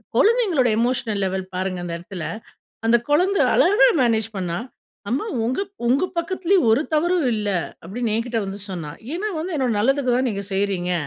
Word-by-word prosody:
குழந்தைகளோட 415 - +3
emotional 230 -4 0
level 190 0 -3
பாருங்க 185 0 -2
அந்த 170 - -4
இடத்தில. 175 0 -8 0.6
அந்த 235 +1 +6
குழந்த 365 +7 +3 0.2
அழகா 410 +7 +5
மேனேஜ் 225 -3 +2
பண்ணா! 175 -2 -2 0.5
"அம்மா 275 - -1 0.2
உங்க 255 +10 -1 0.3
உங்க 270 +8 +3
பக்கத்திலயும் 370 -2 +1
ஒரு 230 +7 +4
தவறும் 345 0 +2
இல்ல." 210 -1 -1 0.3
அப்படின்னு 215 +5 -3
என்கிட்ட 230 +1 -1
வந்து 195 +1 -6
சொன்னா. 165 -5 -5 0.2
ஏன்னா 390 +5 -2
வந்து 335 +3 -3
என்னோட 255 -4 +1
நல்லதுக்கு 260 +3 +2
தான் 255 0 +1
நீங்க 200 -3 -3
செய்றீங்க. 190 -2 0
235 Hz, 155 wpm, -22 LUFS, 195-310 Hz, 0.6 s, அந்த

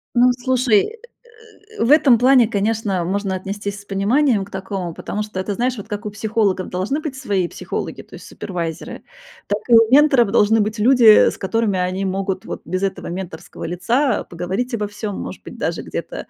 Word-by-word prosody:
Ну, 250 +1 +5
слушай, 250 -2 +2
э, 445 - -8 0.8
э, - - +2
в 235 - +2
этом 275 -6 +6
плане, 250 -1 +5
конечно, 205 -3 -1
можно 195 +1 -2
отнестись 200 +2 -5
с - - -20
пониманием 205 +3 +1
к 200 - -17
такому, 190 -3 -5
потому 210 - -5
что 210 -3 -6
это, 200 +2 -2
знаешь, 245 +3 -1
вот 205 0 -8
как 210 0 -5
у - - -2
психологов 210 -3 -1
должны 195 +12 -2
быть 300 -4 -5
свои 200 -10 -1
психологи, - - -5
то - - -14
есть - - -12
супервайзеры, 170 -4 -6 0.4
так 205 +1 -1
и 235 - +4
у 225 -1 +7
менторов 270 -7 +5
должны 220 0 +4
быть 215 +1 -1
люди, 245 +2 +4 0.2
э, - - +2
с - - -10
которыми 210 -1 0
они 185 +2 -1
могут 190 0 -3
вот - - -6
без 185 +3 -3
этого 195 - -3
менторского 175 -2 -7
лица 235 - 0
поговорить 190 +9 -4
обо 210 -2 -1
всём, 205 0 -5
может - - -7
быть, - - -10
даже - - -2
где-то, - - -6
205 Hz, 195 wpm, -20 LUFS, 190-240 Hz, 0.8 s, у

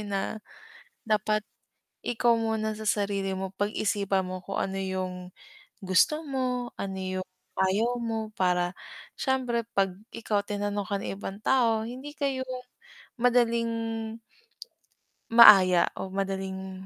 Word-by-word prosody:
na 205 +1 -3 0.7
dapat 215 0 +1 0.6
ikaw 240 0 +2
muna 220 -1 0
sa 215 0 -6
sarili 200 -2 0
mo, 190 0 -4
pag-isipan 200 -2 0
mo 185 0 -5
kung 195 +2 -5
ano 195 0 -2
'yung 185 -1 -4 0.5
gusto 190 +11 +3
mo 250 -2 -2
ano 195 -1 -4
'yung 185 0 -3 0.3
ayaw 215 +6 +2
mo 225 -2 -3
para 180 -1 +1 0.4
siyempre 250 -3 0
'pag 195 -3 +1 0.2
ikaw 210 -3 -1
tinanong 205 0 -2
ka 200 +1 -2
ng - - -5
ibang 200 0 -7
tao, 225 -2 +2
hindi 260 +4 -8
kayo 275 -3 -2 0.7
madaling 235 -1 +2 1.6
maaya 195 -6 +9
o 190 - -5
madaling 190 -1 -4
205 Hz, 120 wpm, -28 LUFS, 190-230 Hz, 1.6 s, maaya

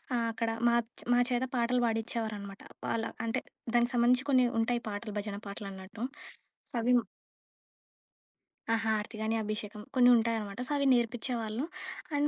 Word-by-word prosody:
ఆహ్, 235 -1 +1
అక్కడ 230 0 -1 0.2
మాచ్ 235 -1 +2 0.3
మా - - +5
చేత 245 +1 +2
పాటలు 245 +1 +2
పాడించేవారనమాట. 220 -3 -2 0.3
వాళ్ళ 225 -1 0 0.2
అంటే, 225 - 0 0.3
దానికి 240 +1 +4
సంబంధించి 250 +3 +4
కొన్ని 255 -1 +6 0.2
ఉంటాయి 240 +1 +1
పాటలు 205 +1 -5
భజన 205 -1 -4
పాటలు 200 0 -6
అన్నట్టు 190 +5 -8 0.8
అవి 240 +2 +3 1.8
ఆ - - +5
హారతి 220 +1 0
కానీ, 220 +1 +1
అభిషేకం 210 0 -4
కొన్ని 250 -1 +7
ఉంటాయి 230 0 +2
అనమాట. 205 -1 -6
సో - - -6
అవి 280 - +1
నేర్పించేవాళ్ళు 235 0 0 0.5
అండ్ 290 +1 +3
230 Hz, 140 wpm, -31 LUFS, 215-240 Hz, 1.8 s, కొన్ని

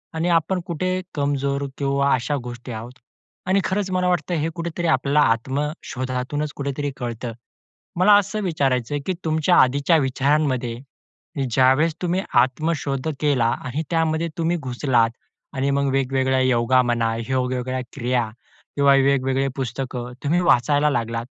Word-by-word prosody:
आणि 170 +2 0
आपण 170 +2 +2
कुठे 185 +2 -1
कमजोर 140 -1 -1
किंवा 140 0 +1
अशा 130 +4 0
गोष्टी 120 0 -8
आहोत 120 +3 -8 0.5
आणि 190 +1 +3
खरंच 190 0 -1
मला 180 0 +1
वाटतं 180 0 0
हे 165 - 0
कुठेतरी 170 0 -3
आपल्याला 150 -2 +2
आत्मशोधातूनच 135 +1 -3
कुठेतरी 140 0 -3
कळतं. 120 -1 -4 0.7
मला 195 +3 +6
असं 205 +2 -4
विचारायचं 135 - 0
आहे, 145 - -1
की 190 - +1
तुमच्या 160 +2 +2
आधीच्या 140 +6 +3
विचारांमध्ये, 135 -3 0 0.7
ज्यावेळेस 135 +6 +3
तुम्ही 180 +2 0 0.2
आत्मशोध 140 +1 -2
केला 140 -6 +2 0.2
आणि 135 +5 -3
त्यामध्ये 165 0 +1
तुम्ही 165 +1 +1
घुसलात 125 -4 +1 0.5
आणि 135 +1 0
मग 140 0 +1
वेगवेगळ्या 130 0 +1
योगा 130 0 +3
म्हणा, 115 -2 0
वेगवेगळ्या 130 0 -1
क्रिया 125 -3 0 0.5
किंवा 140 -1 +5
वेगवेगळे 135 0 +2
पुस्तकं 125 -1 -4
तुम्ही 170 +5 +2
वाचायला 145 -1 +3
लागलात. 115 -2 -2
140 Hz, 130 wpm, -22 LUFS, 130-160 Hz, 0.7 s, मला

